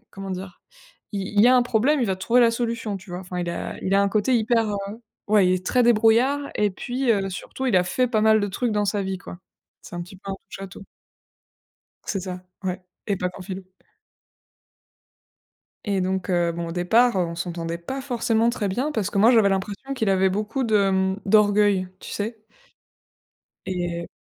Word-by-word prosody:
comment 195 0 -7
dire? 185 0 -7 0.5
Il 200 -1 -2 0.2
il - - +8
y 240 - +7
a 255 - +6
un 250 - +5
problème, 245 +5 +2
il 240 - +1
va 190 -2 0
te - - -21
trouver 240 +5 +3
la 235 -1 +5
solution, 230 -3 -2
tu 190 -1 -13
vois? 180 - -5
Enfin 180 -1 -6
il 175 - -3
a 170 - -5
il 190 - 0
a 200 - +5
un 200 - +2
côté 215 +5 +2
hyper, 225 0 +2
heu 205 - -1 0.5
ouais, 205 -3 +4
il 185 - +3
est 185 0 -3
très 250 +5 +3
débrouillard 235 +5 +4
et 210 -2 +2
puis, 245 +5 -1
heu, 195 -3 0
surtout 230 +7 -6
il 225 - +2
a 180 - +5
fait 250 +8 0
pas 220 -3 +1
mal 220 0 +5
de 205 - 0
trucs 230 +5 -2
dans 210 -1 +1
sa 200 0 0
vie 190 0 -3
quoi. 180 - -10 0.4
C'est - - -10
un 175 - -3
petit 180 +2 -11
peu 195 +1 -7
un 195 - -3
touche-à-tout. 195 0 -9 1.2
C'est 195 - -2
ça 180 -1 -6 0.2
ouais 185 -1 -3 0.3
et 200 - 0
pas 180 - -1
qu'en 185 - -12
philo. 190 0 -6 2.2
Et 200 -2 0
donc 190 0 -1
heu, 175 -1 +2
bon 170 0 -4
au - - -5
départ, 225 +8 +3
on 170 -2 0
s'entendait 170 -1 -4
pas 265 +11 -5
forcément 235 -3 +1
très 210 -4 -2
bien 250 +10 -1
parce 205 -6 -1
que - - -1
moi 220 +4 +6
j'avais 225 -5 +5
l'impression 200 +7 -3
qu'il 220 -5 -1
avait 190 0 +3
beaucoup 215 +7 -2
de 210 -4 +3
mmh, 190 0 +1
d'orgueil 205 -2 +4
tu - - -9
sais? 215 +1 -5 1.2
Et 175 -2 -3
200 Hz, 210 wpm, -24 LUFS, 185-230 Hz, 2.2 s, il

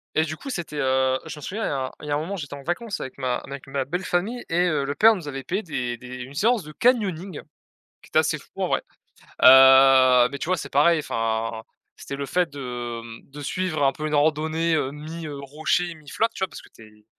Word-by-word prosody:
Et 155 - +4
du 155 0 -4
coup, 275 - -9
c'était, 170 - -5
heu. 130 -1 +2
Je - - -7
m'en - - -10
souviens, 215 +9 -4
il - - 0
y - - -2
a 130 -2 -2
il 150 - -8
y - - -3
a - - +2
un - - 0
moment, 185 +6 -4
j'étais 145 -5 -7
en 140 - -11
vacances 200 - -3
avec 130 - -7
ma 130 -2 -1
avec 140 -1 -9
ma 135 -1 -2
belle-famille 180 - -2
et 175 +2 +2
heu, 150 -4 0
le 140 +1 -2
père 225 0 +6
nous 170 -6 -8
avait 135 -1 -6
payé 195 +4 -2
des 130 -7 -3
des 125 +1 -9
une 135 +3 -11
séance 220 +6 +2
de 155 0 -11
canyoning, 200 - 0 0.6
qui - - -17
était - - +3
assez - - +1
fou - - -17
en - - +1
vrai. - - 0 0.6
Heu, 130 -1 +8
mais 140 - -6
tu - - -4
vois, 185 +1 +1
c'est 140 -2 -7
pareil, 155 +3 +4
enfin, 115 -2 -2 0.3
c'était 140 - -7
le 140 - -4
fait 180 +4 0
de, 120 -4 -5 0.3
mmh, 145 +1 -10
suivre 155 -1 -2
un 135 - +4
peu 155 +3 -5
une 150 - -2
randonnée, 160 +2 +1
heu, 135 -3 0
mi, 155 +3 -8
heu, 145 -2 -6
rocher, 155 +5 -1
mi 155 -2 -18
flotte, 225 +8 0
tu - - -10
vois? - - -5
Parce - - -11
que - - -18
tu 110 - -16
es, 105 -1 -18
145 Hz, 250 wpm, -24 LUFS, 130-170 Hz, 0.6 s, Heu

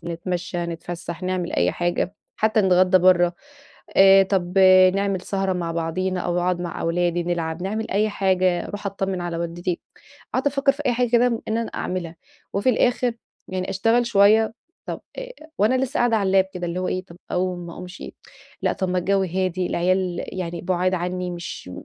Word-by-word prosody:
ونتمشى، 175 +1 -3
نتفسح، 170 +1 -6
نعمل 185 -1 -2
أي 90 +1 +2
حاجة، 175 +2 -1 0.2
حتى 215 0 +2
نتغدى 185 -1 +4
برّه. 175 -1 +4 0.6
آآ 195 0 +8
طب 190 -1 0 0.4
نعمل 195 -2 0
سهرة 195 0 -1
مع 170 -2 -2
بعضينا 180 +3 -2
أو 175 0 -1
أقعد 180 0 0
مع 175 - -5
أولادي 175 +1 0
نلعب، 170 -1 -3
نعمل 215 +3 -3
أي 210 +2 +2
حاجة، 185 -3 +1
أروح 205 0 -6
أتطمن 195 -2 -2
على 175 -1 -3
والدتي. 170 +1 -3 0.5
قاعدة 285 - +1
أفكر 275 0 +2
في 290 +2 -7
أي 245 - +3
حاجة 245 0 0
كده 240 0 +4 0.2
إن 220 +1 0
أنا 230 - -2
أعملها، 175 -2 -4 0.4
وفي 200 +6 0
الآخر 245 +1 +1 0.4
يعني 185 0 -3
أشتغل 225 +5 +2
شوية، 220 +1 +4 0.3
طب - - -5 0.2
آآ - - -6 0.3
وأنا 220 +5 +3
لسه 270 +3 -3
قاعدة 240 -2 +3
على 200 -3 0
اللاب 190 0 +4
كده 180 -1 -4
اللي 175 +2 -3
هو 185 - -2
إيه 185 0 -2
طب 170 -2 -14
أقوم 180 -1 -2
ما 170 - -8
أقومشِ؟ 180 +4 -9 0.6
لأ - - +2
طب 190 - -2
ما 180 0 0
الجو 195 +2 +1
هادي، 185 0 -1
العيال 180 +1 0 0.2
يعني 170 -1 -4
بُعاد 185 +1 0
عني 180 0 -2
مش 170 - -7
185 Hz, 180 wpm, -23 LUFS, 175-200 Hz, 0.6 s, آآ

